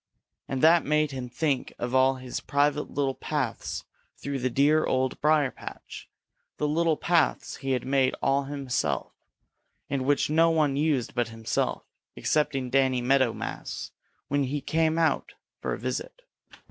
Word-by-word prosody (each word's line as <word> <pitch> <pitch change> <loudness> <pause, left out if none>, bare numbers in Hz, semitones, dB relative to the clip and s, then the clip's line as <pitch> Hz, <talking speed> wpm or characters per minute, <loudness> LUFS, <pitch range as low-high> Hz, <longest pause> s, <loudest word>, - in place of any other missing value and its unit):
And 135 0 -3
that 165 +1 +6
made 150 0 +1
him 130 -2 -5
think 140 0 -1
of 120 +1 -4
all 130 0 +4
his 130 -1 -5
private 145 +1 +1
little 140 -2 0
paths 135 -5 -3 0.3
through 140 -1 -4
the 130 +1 0
dear 145 +5 +3
Old 130 0 0
Briar 150 -3 +3
patch, - - -10 0.5
the 150 - 0
little 160 +1 +2
paths 170 -3 +1
he 135 -1 -2
had 125 -1 -1
made 135 -1 +2
all 140 0 +1
himself, 140 -3 -2 0.8
and 135 -2 0
which 145 +1 +2
no 165 +2 +4
one 155 -4 +2
used 140 -5 0
but 120 -2 0
himself, 115 -1 -2 0.3
excepting 135 -4 0
Danny 130 -1 +3
Meadow 130 0 +3
Mouse - - -6 0.4
when 140 0 +1
he 145 +3 -2
came 160 +2 +1
for 165 -1 -2
a - - -1
visit. - - -5
140 Hz, 150 wpm, -27 LUFS, 130-150 Hz, 0.8 s, that